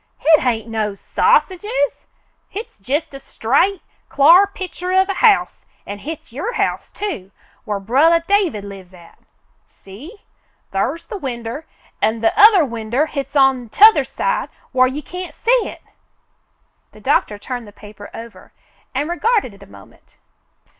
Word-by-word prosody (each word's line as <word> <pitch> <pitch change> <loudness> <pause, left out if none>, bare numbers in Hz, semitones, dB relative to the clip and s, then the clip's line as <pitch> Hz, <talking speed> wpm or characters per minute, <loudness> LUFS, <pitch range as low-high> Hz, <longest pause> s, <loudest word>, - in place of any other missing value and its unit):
"Hit 315 -1 +5
hain't 230 -3 -1
no 215 -3 -2
sausages. 460 - 0 0.4
Hit's 425 - -8
jest 285 +10 -3
a 275 - -8
straight, 280 - 0 0.3
cl'ar 340 +8 +6
pi'cher 370 -1 -2
of 380 +1 +2
a - - +1
house, 420 +1 +2 0.2
an' 205 0 -7
hit's 300 -1 -8
your 400 - -4
house, - - -2
too, 325 - -5 0.4
whar 205 -1 -2
brothah 310 +11 +3
David 370 - +1
lives 190 -2 -11
at. 170 -1 -18 0.5
See? 285 - -14 0.5
Thar's 265 - -2
the 420 -4 -7
winder, 245 +1 -6 0.3
an' 220 0 0
the 225 - +2
other 405 -6 +7
winder 235 +3 -1
hit's 280 -2 -6
on 265 -4 +3
t'othah 430 - +6
side - - -2 0.2
whar 255 0 +4
you 285 +4 -5
can't 360 +3 -8
see - - +2
hit." - - -9 1.1
The - - -15
doctor 210 - 0
turned 245 +2 -6
the - - -12
paper 205 0 -13
over 225 -5 -11 0.4
and 285 +3 -1
regarded 375 - 0
it 200 - -18
a - - -13
moment. 100 -1 -18
275 Hz, 145 wpm, -19 LUFS, -, 1.1 s, other